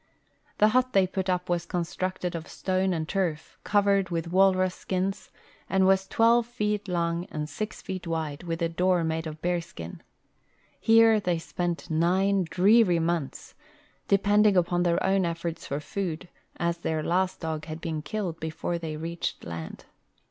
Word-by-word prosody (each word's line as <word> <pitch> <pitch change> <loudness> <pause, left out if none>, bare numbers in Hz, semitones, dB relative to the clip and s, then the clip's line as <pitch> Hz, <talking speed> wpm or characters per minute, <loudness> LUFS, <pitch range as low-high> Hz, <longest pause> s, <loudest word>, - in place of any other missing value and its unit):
The 210 - +5
hut 255 +2 +2
they 195 -1 +5
put 190 0 -3
up 180 0 0
was 175 -1 -1
constructed 180 +1 -3
of 165 -1 -5
stone 185 0 -1
and 160 -3 -2
turf, 175 -5 -2
cov 205 -1 +2
ered 200 -2 +2
with 170 -1 -3
walrus 185 -1 +4
skins, 190 +1 -3 0.4
and 190 0 +3
was 190 0 +3
twelve 230 +2 +3
feet 210 -4 -2
long 170 -1 -1
and 155 -7 -5
six 210 +9 -5
feet 185 -2 -5
wide, 160 -3 -3
with 170 -1 -3
a - - +3
door 180 +1 +2
made 160 0 -2
of 155 0 -7
hear 175 0 +1
skin. 85 - -9 0.8
Here 225 -1 +6
they 180 -4 0
spent 175 +1 -4
nine 185 +4 +2
dreary 195 0 +5
months, 165 -3 -2 0.5
depending 205 0 +4
upon 175 0 +2
their 175 -1 +1
own 190 0 +3
efforts 170 -1 -3
for 140 - -2
food, 175 +2 -4 0.3
as 170 0 -1
their 160 -2 -2
last 185 +3 0
dog 160 -2 -4
had 160 0 -6
been 160 -2 -3
killed 180 -1 -4
Ijefore 160 +2 -3
they 155 -2 -4
reached 165 +2 -4
land. 85 -1 -7
175 Hz, 165 wpm, -27 LUFS, 165-195 Hz, 0.8 s, Here